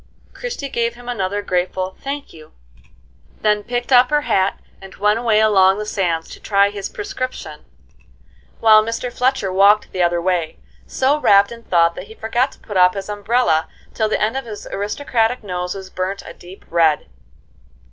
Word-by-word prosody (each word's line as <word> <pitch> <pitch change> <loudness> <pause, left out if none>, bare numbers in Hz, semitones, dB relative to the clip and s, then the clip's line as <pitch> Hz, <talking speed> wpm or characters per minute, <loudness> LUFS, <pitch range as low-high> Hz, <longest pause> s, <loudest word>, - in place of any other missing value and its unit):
Christie 485 - -5
gave 235 -2 -1
him 245 0 -14
another 205 -3 -2
grateful 185 0 -2
"Thank 280 +1 -5
you," 155 -2 -15 0.9
then 210 -1 +2
picked 245 +2 -4
up 250 0 +6
her 295 0 +2
hat 195 -9 0 0.2
and 195 0 -12
went 210 +2 +1
away 225 -3 +2
along 195 -3 +4
the 210 - -4
sands 175 -6 -1
to - - -10
try 200 -1 +2
his 200 -1 -5
prescription; 260 -11 -6 0.9
while 215 -1 +6
Mr. 230 +2 -4
Fletcher 250 -7 0
walked 200 +2 +4
the 185 - -2
other 175 0 +2
way, 170 -2 -1 0.3
so 275 +3 +1
rapt 200 -6 +4
in 235 0 -9
thought 170 -5 +2
that 180 - -9
he 220 - -13
forgot 240 +5 0
to - - -21
put 205 -3 -5
up 180 +1 +5
his 195 +1 -6
umbrella 205 -6 +1 0.3
till 220 -1 0
the - - 0
end 215 +4 0
of 270 -1 -3
his 215 -3 -8
aristocratic 225 +3 -1
nose 180 -2 -4
was 190 -1 -9
burnt 185 +2 -4
a - - -9
deep 180 +2 -14
red. 165 -3 +2
205 Hz, 175 wpm, -19 LUFS, 185-240 Hz, 0.9 s, up